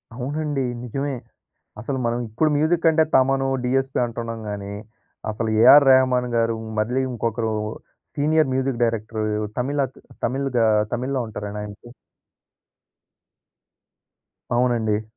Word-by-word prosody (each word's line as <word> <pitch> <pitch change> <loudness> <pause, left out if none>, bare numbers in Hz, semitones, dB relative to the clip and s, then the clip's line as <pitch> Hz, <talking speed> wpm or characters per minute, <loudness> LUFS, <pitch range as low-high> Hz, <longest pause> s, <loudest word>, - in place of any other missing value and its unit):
అవునండి. 145 +2 -2 0.2
నిజమే. 135 +3 -3 0.6
అసలు 130 +4 -3
మనం 120 +1 0
ఇప్పుడు 150 +8 +1
మ్యూజిక్ 165 +2 +2
అంటే 160 0 +4
'తమను', 135 0 +3
'డీఎస్పీ' 135 +1 0
అంటున్నాం 115 -1 -5
గాని, 100 0 -5 0.6
అసలు 110 +1 -2
'ఏఆర్ 135 +5 +8
రెహమాన్ 130 -1 +3
గారు' 115 -1 +1 0.2
మళ్ళీ 125 +5 0
ఇంకొకరు 115 -1 -2 0.6
సీనియర్ 155 -1 +2
మ్యూజిక్ 130 -2 -1
డైరెక్టర్ 110 -1 -2 0.4
తమిళత్ 135 0 -2 0.3
తమిల్‌గా 130 -2 0 0.3
తమిళ్లో 130 +2 -1
ఉంటారండాయనకి 105 +1 -7 2.7
అవునండి. 115 -4 +1
125 Hz, 100 wpm, -22 LUFS, 115-135 Hz, 2.7 s, ఏఆర్